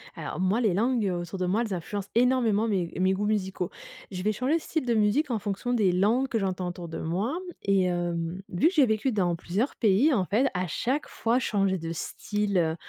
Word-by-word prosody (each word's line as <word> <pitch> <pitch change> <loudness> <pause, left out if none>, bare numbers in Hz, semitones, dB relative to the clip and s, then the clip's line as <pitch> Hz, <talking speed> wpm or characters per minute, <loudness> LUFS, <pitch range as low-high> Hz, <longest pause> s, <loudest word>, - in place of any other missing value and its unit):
Alors - - -5
moi, 190 +6 +2
les 210 -7 +2
langues 235 +2 +1
autour 175 +1 -4
de 180 - 0
moi, 205 +6 +1
elles 210 - -4
influencent 195 +3 -4
énormément 235 -3 +3
mes 185 -6 -1
mes 185 +1 +3
goûts 200 +2 -1
musicaux. 190 -3 -1 0.4
Je 180 -1 -4
vais 210 +3 +1
changer 255 +9 +1
de - - -6
style 315 -2 -2
de 240 - +1
musique 225 +7 +2
en 225 - 0
fonction 205 +4 -2
des 210 -6 +3
langues 215 +9 +2
que 250 - -1
j'entends 185 -3 -1
autour 175 -1 -6
de 165 - -6
moi. 200 - -1 0.2
Et 195 -2 +3
hem, 175 -1 -2
vu 180 - +2
que 355 - +1
j'ai 290 -4 +6
vécu 220 +3 0
dans 180 -5 +1
plusieurs 200 - -2
pays, 225 +8 +3
en 195 -7 +1
fait 225 +9 +2
à 180 0 -1
chaque 255 - -1
fois 235 +2 0
changer 195 -6 0
de 165 0 -5
style 205 +3 -2
heu, 160 -1 +1
205 Hz, 225 wpm, -27 LUFS, 180-235 Hz, 0.4 s, j'ai